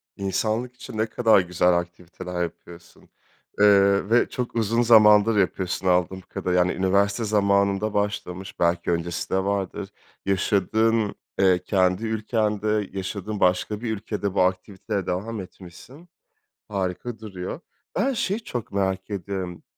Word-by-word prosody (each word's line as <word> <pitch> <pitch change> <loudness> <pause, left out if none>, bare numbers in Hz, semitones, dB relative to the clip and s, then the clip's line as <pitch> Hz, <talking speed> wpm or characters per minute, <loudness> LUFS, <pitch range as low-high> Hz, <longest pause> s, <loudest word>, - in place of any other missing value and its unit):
İnsanlık 110 +6 -2
için 125 - -9
ne 110 - +2
kadar 110 -1 +4
güzel 90 -1 +2
aktiviteler 90 +1 -6
yapıyorsun, 85 0 -10 0.6
eee, 100 -1 +5
ve 120 +2 +3
çok 125 -1 -4
uzun 115 +1 +1
zamandır 110 -2 +6
yapıyorsun 95 0 0
anladığım 90 +1 +1
kadarıyla. 90 -1 -1
Yani, 90 +1 +2
üniversite 100 +3 +1
zamanında 100 0 +1
başlamış, 95 -2 -3
belki 85 0 +1
öncesi 85 +1 -2
de 95 0 +1
vardır, 100 0 -2 0.4
yaşadığın, 105 +3 +1 0.2
eee, 95 -2 +4
kendi 95 +2 +1
ülkende, 105 -2 -1
yaşadığın 100 +2 -4
başka 95 +4 +1
bir 115 -2 -2
ülkede 105 -2 -3
bu 100 - +2
aktiviteye 95 +2 -1
devam 105 +5 -3
etmişsin. 95 - -13 0.6
Harika 100 +4 -3
duruyor. 95 - -6 0.4
Ben 255 +8 +1
şeyi 210 -3 -1
çok 120 - -5
merak 95 -1 -1
ediyorum. 95 -2 -5
100 Hz, 125 wpm, -24 LUFS, 90-110 Hz, 0.6 s, zamandır